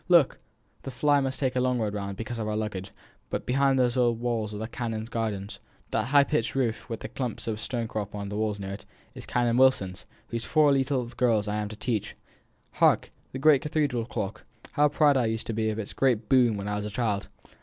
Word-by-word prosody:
"Look! 170 Hz, -6 st, +5 dB, 0.4 s
the -, -, -6 dB
fly 145 Hz, +3 st, +3 dB
must 135 Hz, -1 st, -2 dB
take 130 Hz, -3 st, 0 dB
us -, -, +2 dB
a -, -, +2 dB
long 125 Hz, 0 st, +1 dB
round, 100 Hz, -3 st, -3 dB
because 115 Hz, +1 st, -5 dB
of 110 Hz, -, -2 dB
our 105 Hz, 0 st, -1 dB
luggage; 105 Hz, -3 st, -3 dB, 0.4 s
but -, -, -3 dB
behind 135 Hz, +1 st, +3 dB
these 125 Hz, -2 st, +3 dB
high 130 Hz, -, +2 dB
old 120 Hz, -2 st, +2 dB
walls 115 Hz, -3 st, -1 dB
are 105 Hz, -, -5 dB
the 110 Hz, +1 st, -4 dB
canons' 115 Hz, -2 st, -4 dB
gardens. 105 Hz, -4 st, -3 dB, 0.3 s
That -, -, +1 dB
high 140 Hz, +3 st, +5 dB
pitched 150 Hz, 0 st, -1 dB
roof, 125 Hz, -4 st, -1 dB
with 115 Hz, -1 st, -4 dB
the -, -, -4 dB
clumps 125 Hz, -3 st, -4 dB
of 110 Hz, -1 st, -2 dB
stonecrop 110 Hz, -4 st, -3 dB
on 100 Hz, -1 st, -4 dB
the 105 Hz, -, -5 dB
walls 105 Hz, -1 st, -1 dB
near 95 Hz, -1 st, -5 dB
it, 100 Hz, -, -8 dB, 0.3 s
is -, -, -10 dB
Canon 120 Hz, -1 st, +1 dB
Wilson's, 115 Hz, -8 st, +2 dB, 0.2 s
whose 115 Hz, -1 st, -3 dB
four 150 Hz, +1 st, +4 dB
little 135 Hz, -2 st, +1 dB
girls 115 Hz, -3 st, +1 dB
I 105 Hz, 0 st, -1 dB
am 105 Hz, -1 st, -2 dB
to 110 Hz, -, -8 dB
teach. 110 Hz, -1 st, -2 dB, 0.6 s
Hark! -, -, +3 dB, 0.2 s
the -, -, -5 dB
great 140 Hz, 0 st, +5 dB
cathedral 145 Hz, -6 st, 0 dB
clock. 105 Hz, -3 st, -4 dB, 0.3 s
How 150 Hz, 0 st, +4 dB
proud 145 Hz, -1 st, +4 dB
I 120 Hz, -3 st, +2 dB
used 110 Hz, 0 st, -2 dB
to 115 Hz, -, -3 dB
be 110 Hz, 0 st, 0 dB
of 110 Hz, -, -3 dB
its 110 Hz, -2 st, -5 dB
great 120 Hz, -5 st, +1 dB
boom 120 Hz, -5 st, +4 dB
when 100 Hz, 0 st, -4 dB
I 105 Hz, 0 st, -1 dB
was 105 Hz, -, -3 dB
a -, -, -3 dB
child! 105 Hz, -2 st, -1 dB
115 Hz, 230 wpm, -27 LUFS, 105-130 Hz, 0.6 s, Look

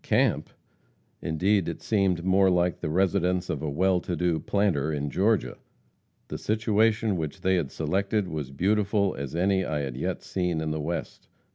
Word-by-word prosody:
Camp! -, -, +1 dB, 0.7 s
Indeed, 90 Hz, +3 st, +1 dB
it 85 Hz, -, -5 dB
seemed 95 Hz, -5 st, +1 dB
more 95 Hz, 0 st, +4 dB
like 90 Hz, -1 st, +1 dB
the 75 Hz, -, -3 dB
residence 90 Hz, +1 st, +1 dB
of 75 Hz, -, -3 dB
a 80 Hz, -, -2 dB
well 90 Hz, +5 st, +2 dB
to 90 Hz, -, -4 dB
do 85 Hz, -2 st, 0 dB
planter 90 Hz, -8 st, 0 dB
in 75 Hz, -1 st, -2 dB
Georgia. 105 Hz, +3 st, +1 dB, 0.7 s
The -, -, -5 dB
situation 110 Hz, -1 st, +1 dB
which 80 Hz, -3 st, -4 dB
they 95 Hz, -, +2 dB
had 85 Hz, -7 st, 0 dB
selected 100 Hz, +6 st, -1 dB
was 75 Hz, -5 st, -4 dB
beautiful 100 Hz, +5 st, +1 dB
as 70 Hz, +2 st, -6 dB
any 95 Hz, +2 st, +2 dB
I 75 Hz, -4 st, -2 dB
had 65 Hz, -3 st, -4 dB
yet 65 Hz, -, -3 dB
seen 90 Hz, -3 st, -1 dB
in 80 Hz, -1 st, -2 dB
the 75 Hz, 0 st, -2 dB
West. 85 Hz, +3 st, -5 dB
90 Hz, 170 wpm, -27 LUFS, 80-100 Hz, 0.7 s, more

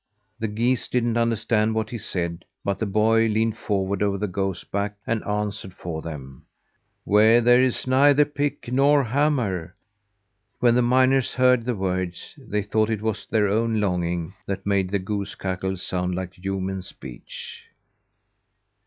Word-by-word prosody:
The 110 Hz, -, -1 dB
geese 115 Hz, +4 st, 0 dB
didn't 120 Hz, -2 st, 0 dB
understand 115 Hz, -1 st, +1 dB
what 110 Hz, 0 st, -2 dB
he 120 Hz, -, -4 dB
said, 85 Hz, -3 st, -3 dB, 0.2 s
but 100 Hz, -1 st, -1 dB
the 110 Hz, -, -1 dB
boy 110 Hz, +3 st, +3 dB
leaned 110 Hz, 0 st, +1 dB
forward 100 Hz, -3 st, -2 dB
over 100 Hz, -1 st, +1 dB
the 105 Hz, -, -1 dB
goose 95 Hz, 0 st, -2 dB
back, 100 Hz, +1 st, -3 dB
and 115 Hz, -2 st, -1 dB
answered 105 Hz, -2 st, -3 dB
for 80 Hz, -2 st, -5 dB
them: 70 Hz, -5 st, -8 dB, 0.6 s
"Where 110 Hz, +3 st, +5 dB
there 120 Hz, +1 st, +5 dB
is 130 Hz, -2 st, 0 dB
neither 140 Hz, +3 st, +5 dB
pick 145 Hz, -3 st, -3 dB
nor 140 Hz, +2 st, +4 dB
hammer." 115 Hz, -, 0 dB, 0.8 s
When 120 Hz, -1 st, +4 dB
the 125 Hz, -, +3 dB
miners 130 Hz, +1 st, +3 dB
heard 125 Hz, -2 st, +3 dB
the 125 Hz, -1 st, -1 dB
words, 95 Hz, -2 st, -3 dB
they 110 Hz, -8 st, -3 dB
thought 110 Hz, +2 st, +1 dB
it 110 Hz, -2 st, -2 dB
was 110 Hz, -2 st, -2 dB
their 105 Hz, -2 st, +2 dB
own 110 Hz, +2 st, +1 dB
longing 90 Hz, -3 st, -1 dB
that 95 Hz, -1 st, -4 dB
made 100 Hz, -2 st, +1 dB
the 100 Hz, -, +1 dB
goose 100 Hz, +1 st, -4 dB
cackle 95 Hz, 0 st, -3 dB
sound 90 Hz, 0 st, -2 dB
like 95 Hz, 0 st, -5 dB
human 95 Hz, +1 st, -3 dB
speech. 60 Hz, -8 st, -10 dB
105 Hz, 155 wpm, -24 LUFS, 95-120 Hz, 0.8 s, Where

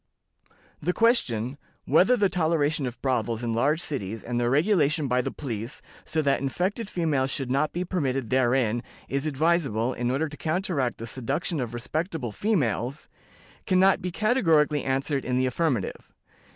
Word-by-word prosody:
"The 180 Hz, +4 st, 0 dB
question, 140 Hz, -, +1 dB, 0.3 s
'whether 185 Hz, -, +4 dB
the 205 Hz, -, +4 dB
toleration 155 Hz, -5 st, +1 dB
of 120 Hz, -, -7 dB
brothels 120 Hz, -3 st, 0 dB
in 115 Hz, -1 st, -1 dB
large 145 Hz, +7 st, +2 dB
cities, 115 Hz, -, -4 dB
and 120 Hz, 0 st, -2 dB
their 120 Hz, 0 st, +1 dB
regulation 155 Hz, -, +2 dB
by 125 Hz, 0 st, +2 dB
the -, -, -3 dB
police, 120 Hz, -2 st, -5 dB, 0.3 s
so 160 Hz, -1 st, 0 dB
that 140 Hz, -2 st, +2 dB
infected 185 Hz, -, -2 dB
females 155 Hz, -8 st, 0 dB
should 135 Hz, -2 st, -3 dB
not 145 Hz, +3 st, +1 dB
be 180 Hz, +2 st, -3 dB
permitted 135 Hz, -, -1 dB
therein, 120 Hz, -2 st, +2 dB, 0.3 s
is 140 Hz, +3 st, -1 dB
advisable, 140 Hz, -6 st, +1 dB
in 120 Hz, 0 st, -2 dB
order 140 Hz, +5 st, 0 dB
to 145 Hz, -1 st, -10 dB
counteract 155 Hz, -6 st, -1 dB
the 115 Hz, -, -6 dB
seduction 140 Hz, +7 st, -2 dB
of 120 Hz, -2 st, -3 dB
respectable 155 Hz, -, -3 dB
females?' 135 Hz, -, -1 dB, 0.6 s
can 185 Hz, -1 st, +3 dB
not 190 Hz, 0 st, +4 dB
be 180 Hz, -, -2 dB
categorically 165 Hz, -, +2 dB
answered 135 Hz, +1 st, 0 dB
in 125 Hz, 0 st, -1 dB
the 130 Hz, -, +2 dB
affirmative. 130 Hz, -, -1 dB
140 Hz, 160 wpm, -26 LUFS, 125-165 Hz, 0.6 s, whether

